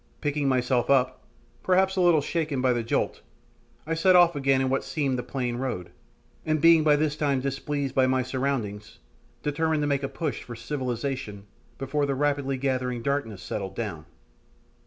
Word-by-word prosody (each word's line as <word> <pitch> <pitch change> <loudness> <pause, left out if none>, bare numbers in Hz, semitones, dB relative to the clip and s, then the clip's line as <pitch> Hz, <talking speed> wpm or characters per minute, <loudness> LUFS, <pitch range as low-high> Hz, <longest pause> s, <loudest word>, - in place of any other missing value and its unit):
Picking 145 -1 0
myself 125 -1 +1
up, 130 -2 +2 0.4
perhaps 190 +1 +2
a 185 - +1
little 175 -4 +5
shaken 155 -2 -2
by 130 -1 +3
the 120 - -1
jolt, 115 - -1 0.6
I 165 - -2
set 180 +3 +4
off 175 -1 +6
again 135 -1 +2
upon 130 -1 0
what 135 - 0
seemed 140 -4 -1
the - - 0
plain 125 -2 -3
road, 120 -9 -4 0.5
and 155 0 0
being 165 +1 +6
by 150 -1 +5
this 150 0 0
time 145 -3 +1
displeased 135 +1 -3
by 130 -1 +3
my 130 0 +1
surroundings, 125 -6 -3 0.5
determined 155 +1 0
to - - +1
make 140 -1 +1
a 135 - -3
push 145 +2 -3
for 120 - -9
"civilization" 125 -4 -4 0.3
before 140 +2 -1
the 140 - 0
rapidly 140 -1 0
gathering 125 -2 -1
darkness 125 -8 -2
settled 95 -2 -5
down. 85 -9 -5
135 Hz, 175 wpm, -26 LUFS, 125-150 Hz, 0.6 s, off